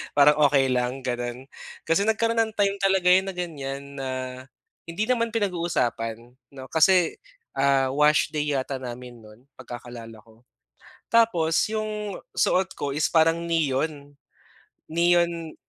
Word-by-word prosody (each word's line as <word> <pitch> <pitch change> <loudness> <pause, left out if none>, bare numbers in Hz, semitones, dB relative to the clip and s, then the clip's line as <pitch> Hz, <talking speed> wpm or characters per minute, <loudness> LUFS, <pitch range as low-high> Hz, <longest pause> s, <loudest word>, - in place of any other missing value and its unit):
Parang 145 +1 +5
okey 135 -2 +2
lang, 125 +1 -1
gano'n. 120 0 -4 0.4
Kasi 200 +6 +1
nagkaroon 230 +1 +1
ng 220 -1 0
time 200 -1 +1
talaga 190 -2 +2
yun 190 +1 +4
na 190 - -5
ganyan 140 -6 -5 0.2
na 135 -1 -4 0.8
hindi 170 +5 -2
naman 230 -1 +1
pinag-uusapan 130 - -2 0.2
'no, 130 -1 -8
kasi, 175 +1 +3 0.3
ah, 135 -1 +2
wash 150 +2 +3
day 150 -1 -1
yata 135 0 -3
namin 125 -1 -8
no'n 110 +2 -17 0.2
pagkakaalala 120 -2 -9
ko. 110 0 -22 0.7
Tapos 180 -9 +3 0.2
'yong 215 -2 -4 0.2
suot 190 +1 +1
ko 145 - -4
is 145 +2 0
parang 165 +1 +2
neon. 145 -2 -1 0.7
Neon, 170 -1 +1
155 Hz, 130 wpm, -25 LUFS, 130-185 Hz, 0.8 s, Parang